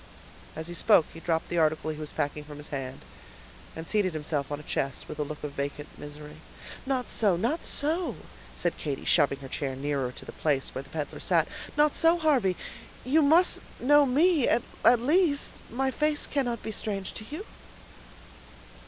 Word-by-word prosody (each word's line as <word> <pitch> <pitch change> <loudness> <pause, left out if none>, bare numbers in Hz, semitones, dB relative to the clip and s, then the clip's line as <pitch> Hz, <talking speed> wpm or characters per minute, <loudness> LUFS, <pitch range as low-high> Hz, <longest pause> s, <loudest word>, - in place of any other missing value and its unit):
As 160 - -5
he 175 - -6
spoke 175 -1 +5
he 165 - -9
dropped 165 -1 -1
the 175 - 0
article 155 0 +1
he 155 - -7
was 155 -1 -5
packing 145 +1 -2
from 150 -1 -10
his 150 - -9
hand, 135 -2 -5 0.7
and 160 0 -7
seated 205 -5 +1
himself 150 -2 -2
on 145 - -3
a - - -11
chest, 135 -2 -3
with 150 - -8
a - - +2
look 150 +1 -7
of 150 - -3
vacant 145 +1 -4
misery. 150 +1 -10 0.5
"Not 260 -2 0
so, 205 -5 +2
not 240 - -1
so," 325 +5 +1 0.4
said 175 - -1
Katy, 140 -3 -4
shoving 145 -4 +3
her 135 - -7
chair 135 0 -3
nearer 135 -2 -1
to - - -12
the - - -8
place 140 -4 -1
where 130 - -4
the 135 - -16
peddler 155 -2 -5
sat. - - +2 0.3
"Not 300 0 +4
so, 330 +1 +4
Harvey, 265 - +2 0.5
you 295 +5 +4
must 320 +5 +5 0.2
know 290 +2 +5
me 300 +2 +4
at 235 - +3 0.2
least; 285 +6 +4 0.2
my 265 +3 0
face 300 +2 +1
cannot 245 -5 -1
be 220 - -4
strange 200 -2 -3
to 215 - -8
you." 330 +8 -6
175 Hz, 185 wpm, -28 LUFS, -, 0.7 s, spoke